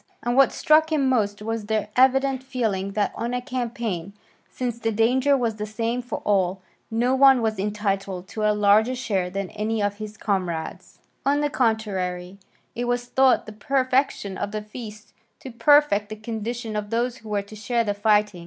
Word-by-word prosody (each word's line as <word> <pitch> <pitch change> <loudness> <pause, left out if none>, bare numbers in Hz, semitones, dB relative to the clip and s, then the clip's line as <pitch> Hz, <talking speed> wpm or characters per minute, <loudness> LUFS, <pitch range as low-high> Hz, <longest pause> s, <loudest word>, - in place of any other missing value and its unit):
And 240 0 0
what 275 0 +5
struck 315 +1 +3
him 285 -4 +2
most 210 -5 0
was 225 -1 -3
their 215 -1 -1
evident 265 +1 +3
feeling 220 -7 -2
that 210 0 0
on 240 +2 -3
a - - 0
campaign, 235 -7 -4 0.4
since 240 -2 -4
the 225 -1 -1
danger 255 +6 +3
was 230 -4 -1
the 210 0 -4
same 230 +3 -2
for 245 - -6
all, 190 -2 +1 0.3
no 240 +3 +1
one 270 -1 +6
was 220 -2 -1
entitled 195 -2 -2
to 215 - -5
a 215 - +3
larger 210 +4 +3
share 200 -8 -1
than 195 0 -4
any 215 +1 -2
of 205 0 -1
his 215 0 -8
comrades; 180 -7 -3 0.3
on 285 +1 +2
the 295 -1 0
contrary, 195 -7 -1 0.3
it 245 +1 -3
was 245 0 -1
thought 265 +1 +3
the 215 - -9
perfection 255 -3 0
of 205 - -3
the 215 0 -4
feast 210 -1 -10 0.3
to 265 - -8
perfect 235 -4 +4
the 215 - -5
condition 225 +1 -5
of 210 -1 -3
those 240 +2 -1
who 220 - -12
were 205 -1 -1
to 200 +2 -12
share 235 +2 0
the 205 -2 -1
fighting. 210 -2 +2
220 Hz, 185 wpm, -24 LUFS, 205-250 Hz, 0.4 s, one